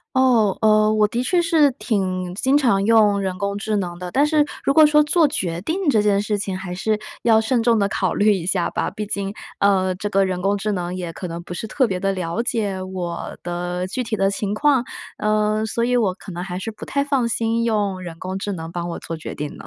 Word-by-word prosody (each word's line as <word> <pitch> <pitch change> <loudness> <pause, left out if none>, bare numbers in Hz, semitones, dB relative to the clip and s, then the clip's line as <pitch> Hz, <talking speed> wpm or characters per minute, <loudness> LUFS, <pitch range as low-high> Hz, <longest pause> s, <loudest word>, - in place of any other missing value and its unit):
哦， 240 -7 +3
呃， 215 0 +4
我 215 -1 +3
的 235 +3 -2
确 345 +7 +2
是 320 -4 +4
挺 185 -7 -2
经 265 +9 +2
常 235 -9 +2
用 215 -2 +4
人 190 -1 -3
工 200 +2 -2
智 215 +1 -2
能 175 -4 -3
的。 180 -1 -5
但 280 +7 +3
是 300 0 +3 0.2
如 275 - +2
果 310 +1 +7
说 300 0 +5
做 310 +1 +3
决 175 - -3
定 335 - -1
这 220 -6 +4
件 205 -1 +2
事 210 0 -1
情 195 -2 -3
还 190 -2 -6
是 215 +3 -1 0.2
要 225 -2 +4
慎 230 +2 +1
重 230 -1 +3
地 200 - +2
考 190 -2 -1
虑 210 +1 +4
一 180 -4 -3
下 180 -2 0
吧。 - - -1
毕 210 - -5
竟， 200 -1 -3 0.3
呃， 190 -2 +3
这 205 +3 -4
个 195 -1 +3
人 185 -1 -2
工 200 +2 +1
智 210 +2 -2
能 180 -2 -3
也 175 -2 -5
可 180 - -6
能 170 0 -6
不 175 - -7
是 200 +5 -5
特 260 +4 +2
别 190 -5 -2
地 195 +1 0
了 180 +3 -2
解， 210 -6 -2
我 180 -2 -5
的 175 +1 -3
具 250 +7 -3
体 225 -2 -2
的 195 -1 +1
情 200 0 -2
况。 280 0 +3 0.3
呃， 215 0 +1
所 235 +2 -1
以 250 +1 +1
我 205 -6 +1
可 195 - -11
能 175 +1 -5
还 180 -1 -5
是 190 +4 -4
不 215 - -12
太 280 - 0
放 275 -4 +1
心 230 0 0
用 205 -4 0
人 170 -2 -8
工 185 +2 -5
智 205 - -3
能 165 -2 -6
帮 175 0 -4
我 170 - -5
做 165 - -6
决 160 - -7
定 150 0 -5
呢。 - - -11
205 Hz, 265 characters per minute, -21 LUFS, 185-230 Hz, 0.3 s, 果